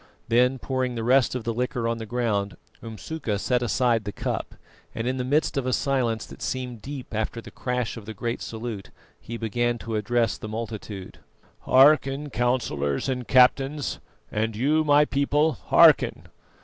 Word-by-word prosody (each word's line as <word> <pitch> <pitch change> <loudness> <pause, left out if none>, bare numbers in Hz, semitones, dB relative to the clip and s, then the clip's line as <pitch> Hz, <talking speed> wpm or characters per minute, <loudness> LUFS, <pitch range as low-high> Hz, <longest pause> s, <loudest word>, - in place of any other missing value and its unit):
Then 125 +3 +3
pouring 130 -1 -2
the 115 - -3
rest 125 +1 +3
of 125 - -3
the 115 - -2
liquor 125 0 -2
on 115 0 -1
the 110 - -6
ground, 105 -6 -1 0.2
Umsuka 115 +1 -4
set 125 +4 0
aside 120 -1 +1
the 105 - -4
cup, - - -4 0.4
and 115 - -3
in 130 +1 -1
the 125 - -1
midst 145 +3 +1
of 130 -2 -1
a 130 - +1
silence 125 -6 0
that - - -13
seemed 125 -3 -4
deep 135 -2 -8
after 110 +2 -2
the - - -11
crash 125 -3 -3
of 110 - -9
the 110 - -6
great 115 +4 -3
salute, 110 -3 -6 0.3
he 115 - -7
began 120 +2 -1
to 115 -1 -5
address 115 +1 0
the 110 - -7
multitude: 110 -3 -6 0.5
"Hearken, 140 +1 +4
Councillors 120 - 0
and 125 -2 -3
Captains, 135 +3 +3 0.3
and 110 +1 -1
you, 150 +7 +2
my 145 0 +5
people, 145 +3 +1
hearken. - - +4
120 Hz, 170 wpm, -25 LUFS, 110-130 Hz, 0.5 s, my